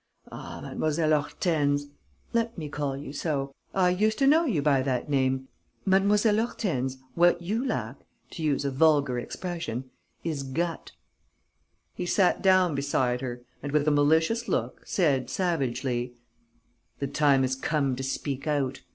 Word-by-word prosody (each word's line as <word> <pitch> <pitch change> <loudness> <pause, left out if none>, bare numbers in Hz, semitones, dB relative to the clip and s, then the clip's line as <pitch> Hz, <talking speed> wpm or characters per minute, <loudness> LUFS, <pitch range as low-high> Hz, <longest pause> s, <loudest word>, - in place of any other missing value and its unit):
Ah, - - -8
Mlle. 155 0 +1
Hortense 145 -2 0 0.5
let 230 -1 0
me 155 -3 -5
call 145 -2 -2
you 140 0 -7
so: 140 -3 -2 0.2
I 180 -2 +3
used 215 +4 +1
to 275 - +2
know 315 +5 +5
you 215 - +1
by 140 -3 +3
that 130 +1 -2
name 130 -1 +1 0.4
Mlle. 195 +2 +4
Hortense, 205 - 0 0.2
what 175 0 +4
you 210 +8 -2
lack, 270 - -3 0.3
to - - -7
use 145 -2 0
a 140 - 0
vulgar 145 -3 +3
expression, 150 -5 -5 0.3
is 155 -4 -2
gut." 165 +5 -3 1.0
He 180 - -4
sat 185 0 +3
down 185 -3 +4
beside 130 -3 0
her 120 -2 -5 0.2
and, 145 - -4
with 150 0 +2
a - - +5
malicious 160 +11 +2
look, - - -2
said, 135 -9 +1
savagely: 130 -7 -1 0.8
"The 140 - -2
time 140 -1 +3
has 130 0 0
come 140 -1 0
to 130 - -5
speak 135 +1 -3
out. 135 -3 -1
145 Hz, 150 wpm, -27 LUFS, 135-175 Hz, 1.0 s, know